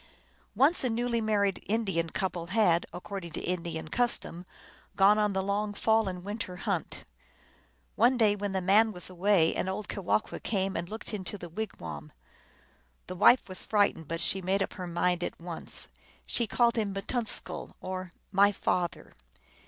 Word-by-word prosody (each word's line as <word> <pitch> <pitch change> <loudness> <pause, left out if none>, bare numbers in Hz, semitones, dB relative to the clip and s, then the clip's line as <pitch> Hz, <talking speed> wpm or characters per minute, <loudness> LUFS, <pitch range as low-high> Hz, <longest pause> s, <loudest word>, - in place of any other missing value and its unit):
Once 275 - +5
a 255 - +1
newly 235 0 0
married 205 -3 +1
Indian 195 -7 0
couple 180 -2 -3
had, 180 -4 +3
accord 190 +2 -6
ing 170 - -8
to - - -3
Indian 170 -3 -3
custom, 180 -4 -1 0.5
gone 200 +2 +5
on 210 -1 +2
the 190 0 0
long 205 +1 -1
fall 220 0 +2
and 180 -1 -6
win 205 +3 -5
ter 185 -5 -5
hunt. - - -3 0.9
One 245 +3 +4
day 215 -3 +4
when 205 -1 -3
the 190 -1 -1
man 215 +4 +5
was 180 0 -3
away 185 -2 +3
an 190 - -1
old 195 +2 -4
Kewahqu 200 +2 -1
came 195 -3 -1
and 170 +1 -3
looked 220 +1 -7
into 205 0 -4
the 175 -2 -8
wigwam. 80 - -6 0.9
The 185 - -6
wife 245 +7 +6
was 185 -1 -3
frightened, 200 -7 +1
but 165 +2 -3
she 190 - +1
made 195 +2 +1
up - - -5
her 180 -2 -6
mind 175 +1 0
at - - -4
once: 170 -1 -6 0.4
she 235 - 0
called 235 +1 +2
him 205 -3 -1
Mittunksl, 220 +3 -3
or 185 -1 -5
" - - -41
my 200 +1 +5
father." 180 -3 -2
195 Hz, 175 wpm, -29 LUFS, 180-215 Hz, 0.9 s, wife